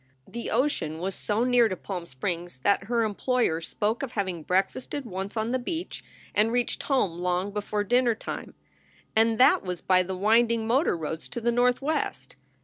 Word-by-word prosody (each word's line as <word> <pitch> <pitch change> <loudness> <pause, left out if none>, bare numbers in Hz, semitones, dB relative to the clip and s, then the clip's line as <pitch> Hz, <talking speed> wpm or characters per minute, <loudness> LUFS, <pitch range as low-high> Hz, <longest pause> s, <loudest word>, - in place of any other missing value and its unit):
The 235 0 -5
ocean 225 - 0
was 190 +3 -3
so 215 +4 -1
near 245 -2 +4
to 185 - -2
Palm 180 -2 -6
Springs 170 +3 -4
that 200 -1 +2
her 230 +1 +1
employer 215 -5 0
spoke 210 +6 -1
of 270 -3 -4
having 190 -5 -2
breakfasted 195 - -1
once 195 0 -5
on 220 +2 0
the 255 - +1
beach 330 +7 -4 0.3
and 215 +2 +3
reached 245 0 0
home 200 - 0
long 180 +2 0
before 205 0 -2
dinner 245 +2 +3
time. - - -7 0.6
And 225 0 +4
that 255 - +6
was 180 -2 -4
by 185 -1 +3
the 185 +1 -4
winding 225 +3 +3
motor 245 - +2
roads 160 0 -5
to - - -4
the 235 +1 +1
Northwest. 250 +6 0
215 Hz, 175 wpm, -27 LUFS, 185-240 Hz, 0.6 s, that